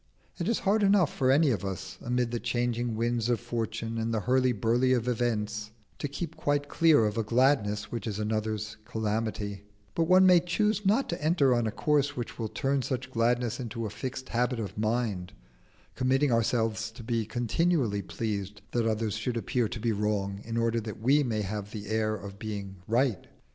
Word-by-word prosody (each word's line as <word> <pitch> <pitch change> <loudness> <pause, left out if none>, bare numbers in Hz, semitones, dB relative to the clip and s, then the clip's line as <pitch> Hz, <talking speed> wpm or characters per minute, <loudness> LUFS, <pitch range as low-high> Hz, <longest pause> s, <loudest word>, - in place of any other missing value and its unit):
It - - -1
is 230 - +2
hard 210 +3 +3
enough 195 -5 +4
for 130 - +1
any 140 +1 +5
of 100 -6 -1
us, 95 0 -5
amid 125 -1 0
the 120 - -1
changing 120 0 -1
winds 115 +1 0
of 120 - +2
fortune 115 -1 -3
and 115 +1 -1
the 110 -2 0
hurly 130 +3 +3
burly 120 +4 +2
of 120 -1 0
events, 110 -3 -1 0.3
to - - -2
keep 145 +5 -5
quite 145 0 0
clear 155 -6 +4
of 105 +2 -1
a - - +1
gladness 115 -3 +2
which 115 -3 -4
is 105 -2 -3
another's 110 0 -2
calamity; 105 -2 -2 0.3
but 165 - +1
one 185 +1 +7
may 180 -1 +7
choose 205 +4 0
not 220 +7 +3
to 170 -3 -3
enter 150 -5 +4
on 120 -2 +1
a - - -1
course 145 +2 +1
which 120 0 -5
will 110 - -1
turn 135 +4 0
such 130 0 -3
gladness 120 0 +1
into 115 -2 -4
a 105 - -4
fixed 130 +2 -5
habit 125 +1 0
of 100 -4 -4
mind, 110 -4 -1 0.6
committing 130 +2 +2
ourselves 115 -1 +1
to 115 +1 -11
be 115 0 0
continually 120 - 0
pleased 105 0 -4
that 120 -2 +1
others 110 -1 -1
should 115 +2 -2
appear 115 +2 0
to 120 - -5
be 115 +1 0
wrong 100 -1 -1
in 115 0 -4
order 115 0 +1
that 105 -2 -7
we 135 +7 +4
may 110 -6 -1
have 100 +1 -4
the 105 -1 -7
air 110 0 +1
of 100 -1 -9
being 100 -3 -5
right. 120 -1 +1
115 Hz, 195 wpm, -29 LUFS, 110-130 Hz, 0.6 s, one